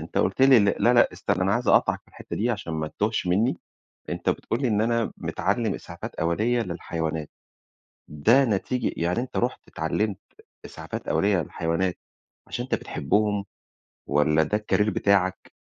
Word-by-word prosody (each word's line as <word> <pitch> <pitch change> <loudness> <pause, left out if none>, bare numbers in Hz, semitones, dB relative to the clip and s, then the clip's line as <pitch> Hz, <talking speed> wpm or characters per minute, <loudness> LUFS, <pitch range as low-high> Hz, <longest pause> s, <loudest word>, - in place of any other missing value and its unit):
أنت 80 - -4
قُلت 95 +8 +1
لي 135 -2 +8
لا، 105 +3 +3
لأ، 120 - +5
استنّى - - -1
أنا - - +2
عايز - - -1
أقاطعك - - +4
في - - -27
الحِتّة - - -8
دي 120 +4 +1
عشان 100 -7 -4
ما 80 -1 -2
تتوهش 105 +1 -1
مِنِّي، 105 +8 +2 0.5
أنت - - -1
بتقول 115 - -2
لي 130 - +2
إن 105 -1 +2
أنا 115 0 +1
متعلم 115 -4 -1
إسعافات - - -8
أولية 110 +9 +1
للحيوانات. 80 -5 -4 0.8
ده 115 - +4
نتيج 115 +4 -1
يعني 85 +6 0
أنت 125 +1 -4
رُحت 125 +2 0
اتعلمت 95 +6 -2 0.5
إسعافات - - -7
أولية 100 -3 +2
للحيوانات، 85 +4 -2 0.5
عشان 120 - -4
أنت 130 - -1
بتحبهم، 105 +7 0 0.6
والّا 75 +2 +3
ده 105 +6 0
الCareer 105 0 +1
بتاعك؟ 95 -2 +1
100 Hz, 155 wpm, -25 LUFS, 85-115 Hz, 0.8 s, لي